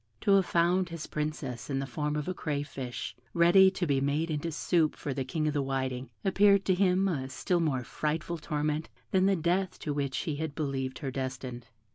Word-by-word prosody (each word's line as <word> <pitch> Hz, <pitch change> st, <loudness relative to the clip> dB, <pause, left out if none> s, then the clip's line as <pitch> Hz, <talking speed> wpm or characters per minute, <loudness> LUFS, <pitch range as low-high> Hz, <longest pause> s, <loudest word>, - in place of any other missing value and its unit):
To 200 Hz, -, +2 dB
have 195 Hz, -2 st, +5 dB
found 175 Hz, +2 st, +2 dB
his 165 Hz, -2 st, -6 dB
Princess 150 Hz, -6 st, -4 dB
in 135 Hz, -, 0 dB
the 135 Hz, -, -1 dB
form 150 Hz, +3 st, -2 dB
of 150 Hz, -1 st, -2 dB
a 185 Hz, -, -1 dB
crayfish, 140 Hz, -6 st, -4 dB, 0.2 s
ready 175 Hz, +3 st, +7 dB
to 185 Hz, -1 st, -2 dB
be 140 Hz, -4 st, +1 dB
made 150 Hz, +4 st, 0 dB
into 155 Hz, +2 st, -2 dB
soup 160 Hz, 0 st, +1 dB
for 145 Hz, -, -4 dB
the 135 Hz, -, -2 dB
King 155 Hz, +4 st, -1 dB
of 150 Hz, -, 0 dB
the 145 Hz, -, +1 dB
Whiting, 130 Hz, -1 st, -2 dB, 0.2 s
appeared 200 Hz, 0 st, +5 dB
to 190 Hz, -, +3 dB
him 185 Hz, +1 st, +3 dB
a 135 Hz, -8 st, -2 dB
still 175 Hz, +6 st, 0 dB
more 140 Hz, -6 st, 0 dB
frightful 160 Hz, +5 st, -2 dB
torment 150 Hz, +1 st, -2 dB, 0.2 s
than 190 Hz, 0 st, +4 dB
the 195 Hz, -, +4 dB
death 180 Hz, +2 st, 0 dB
to 150 Hz, -, -2 dB
which 140 Hz, -2 st, -1 dB
he 150 Hz, -3 st, -3 dB
had 155 Hz, -2 st, -3 dB
believed 135 Hz, -3 st, -2 dB
her 135 Hz, -, -1 dB
destined. 130 Hz, -2 st, -5 dB
150 Hz, 205 wpm, -30 LUFS, 135-175 Hz, 0.2 s, ready